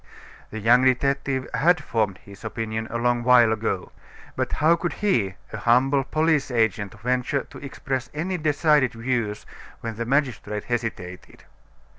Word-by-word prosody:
The 110 - -7
young 120 +4 +5
detective 135 0 +1
had 175 +3 +3
formed 105 -5 -1
his 100 -1 -14
opinion 110 0 -4
a 115 - -3
long 120 0 +1
while 120 -2 +5
ago. 105 -4 -3 0.4
But - - -2
how 160 +3 +4
could 175 0 -3
he, 115 - 0 0.2
a - - -3
humble 130 +5 +3
police 155 0 +1
agent, 110 -5 0
venture 125 +3 0
to - - -13
express 135 -2 -4
any 175 +4 -3
decided 150 -3 +2
views 115 -3 -2 0.4
when 115 -2 -5
the 115 - -3
magistrate 125 -6 -1
hesitated? 110 -7 -5
125 Hz, 145 wpm, -24 LUFS, 110-140 Hz, 0.4 s, young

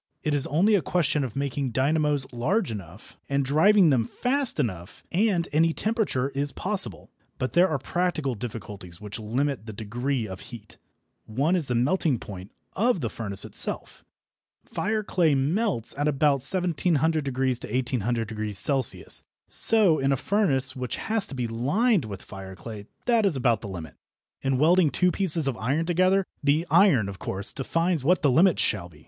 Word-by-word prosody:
It 150 - 0
is 145 -2 +1
only 185 +9 +2
a 200 - +3
question 155 -1 0
of 125 -5 -6
making 140 -2 -2
dynamos 145 +1 +1
large 165 - 0
enough, 100 -1 -10
and 140 0 0
driving 170 +5 +4
them 120 -4 +1
fast 260 - -1
enough, 90 - -4
and 185 -2 +1
any 160 +2 +3
temperature 210 - -1
is 140 +1 -2
possible. 185 - -2 0.3
But 130 -2 -3
there 175 +3 +5
are 155 - 0
practical 155 -1 -2
difficulties 105 -6 -8
which 105 +2 -7
limit 120 +2 -2
the 110 - -7
degree 120 +3 -3
of 95 -1 -8
heat. 110 0 -12 0.5
One 140 +11 0
is 165 -6 -1
the 125 - -1
melting 140 +2 +1
point 95 -2 -10 0.2
of 225 -3 +1
the 115 - -3
furnace 100 -4 -4
itself. - - -2 0.6
Fire 215 +1 -2
clay 170 -7 +1
melts 155 - 0
at 145 +2 -1
about 145 -1 +2
1700° 160 -1 +3
to 130 -2 -1 0.2
1800° 115 +1 -1
C. - - +1 0.4
So 205 -8 +4
in 135 0 +1
a 135 - +1
furnace 135 - 0
which 125 -1 -4
has 220 -2 -1
to 140 - -8
be 125 -2 -2
lined 145 - +1
with 100 -3 -8
fire 95 -1 -10
clay 105 +2 -9 0.2
that 235 -2 +3
is 195 -7 +1
about 120 -5 +1
the 105 - -7
limit. 85 -5 -8 0.5
In 135 -1 0
welding 165 +3 +4
two 180 +4 +2
pieces 170 -6 +4
of 135 - -1
iron 140 +8 -1
together, 185 +3 +2 0.2
the 150 +4 +2
iron, 165 - +4
of 100 -1 -8
course, 100 +2 -3
defines 165 +2 -1
what 175 +4 +2
the 140 - +4
limit 170 +6 +4
shall 95 -4 -1
be. 75 -3 -19
140 Hz, 170 wpm, -25 LUFS, 115-175 Hz, 0.6 s, there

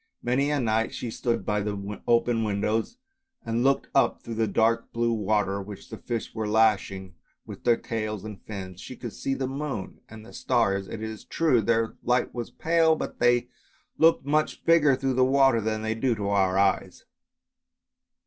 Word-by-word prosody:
Many 130 +4 +1
a 150 -1 +1
night 115 -2 0
she 120 - -4
stood 115 -4 -2
by 105 0 0
the 100 0 -5
open 120 -1 +2
windows 110 - -1 0.5
and 115 +1 0
looked 135 0 +2
up - - +3
through 115 - -6
the 110 0 0
dark 115 +3 +1
blue 115 0 0
water 105 -2 0
which 100 0 -10
the - - -6
fish 115 -2 -4
were 110 -1 -3
lashing 100 -3 +1 0.3
with - - -10
their 120 -1 +4
tails 110 -3 -4
and 105 -2 -8
fins. 95 -3 -8
She 130 - -8
could 120 -3 -7
see 135 - -2
the 135 - -2
moon 135 -6 -5
and 110 0 -11
the - - -14
stars, 100 -6 0
it 110 - -6
is 110 -1 -6
true, 155 -8 +2
their 115 +1 0
light 125 0 +1
was 120 -2 -5
pale, 160 0 +2
but - - -6
they 120 0 +3 0.5
looked 165 -4 +4
much 155 +2 0
bigger 155 -5 +5
through 135 0 -1
the 130 0 +3
water 135 -2 +4
than 110 0 -2
they 110 0 0
do 120 +1 0
to 100 -1 -3
our 95 -2 +2
eyes. 100 0 0
115 Hz, 185 wpm, -26 LUFS, 105-130 Hz, 0.5 s, bigger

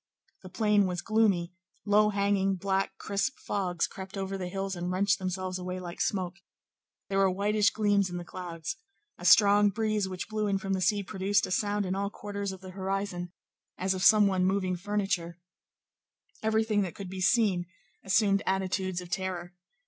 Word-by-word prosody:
The 185 - -10
plain 210 0 +2
was 180 -1 -3
gloomy; 200 -6 +2 0.3
low 210 +1 +4
hanging, 200 -1 +1
black, 195 +1 -1
crisp 205 +6 -2
fogs 180 -4 -1
crept 190 +1 -8
over 195 0 -3
the 185 -2 -4
hills 195 +1 -3
and 175 0 -3
wrenched 185 +1 +2
themselves 185 0 -3
away 180 0 -4
like 175 -1 -6
smoke: 180 -3 -1 0.7
there 195 0 0
were 195 -1 +4
whitish 205 +3 +2
gleams 205 -3 +1
in 175 - -5
the 175 - -6
clouds; 170 +2 -6 0.4
a - - -8
strong 205 +3 +6
breeze 215 -1 -1
which 185 0 -5
blew 215 0 -1
in 200 -1 +1
from 195 0 -3
the 190 - -1
sea 200 +2 +2
produced 195 +1 +1
a - - -7
sound 205 +1 0
in 185 - -1
all 200 +1 -1
quarters 200 -1 -5
of 190 -1 -10
the 185 -1 -9
horizon, 190 -2 -3 0.5
as 190 +1 0
of 185 - -4
some 210 +2 +7
one 190 -2 +2
moving 185 -1 +1
furniture; 195 -3 -2 1.0
everything 220 -1 +2
that 185 -4 -3
could 200 - -7
be 185 +1 -6
seen 190 -4 +2 0.4
assumed 195 0 +3
attitudes 190 -1 -1
of 175 -1 -11
terror. 180 -1 -3
195 Hz, 180 wpm, -29 LUFS, 185-205 Hz, 1.0 s, some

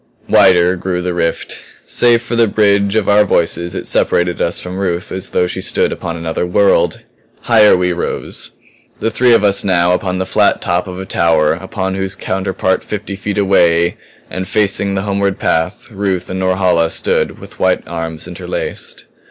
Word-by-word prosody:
Wider 90 -1 +4
grew 90 0 -3
the 90 0 -2
rift. 85 -1 -3 0.2
Save 120 -1 +3
for 120 - -3
the 115 -1 +4
bridge 100 -1 +2
of 110 -3 +1
our 105 +1 +5
voices 85 -2 0
it - - -5
separated 90 0 0
us 85 - +1
from 90 +1 -6
Ruth 90 -2 -2
as 95 - -3
though 90 - +1
she 90 - -4
stood - - +1
upon 85 0 -5
another 80 0 -3
world. 95 +3 +1 0.4
Higher 105 -3 +5
we 90 0 0
rose; 85 - -3 0.5
the 115 - -1
three 125 +2 +3
of 115 - +4
us 100 -1 +3
now 90 -3 +2
upon 90 0 -2
the 95 - -2
flat - - +2
top 90 +2 -1
of 90 0 -7
a 95 - -6
tower 80 -5 +2
upon 95 +2 -4
whose 95 0 -3
counterpart 95 -1 -2
fifty 105 -1 -5
feet 100 +1 -4
away 85 -4 +3 0.3
and 95 0 -5
facing 100 -1 +1
the 95 - -2
homeward 100 -1 -1
path, 80 +8 -2
Ruth 95 -3 -2
and 95 - -3
Norhala 95 -3 +1
stood - - 0
with - - -13
white - - +1
arms 80 -1 -5
interlaced. - - -6
95 Hz, 175 wpm, -15 LUFS, 90-100 Hz, 0.5 s, our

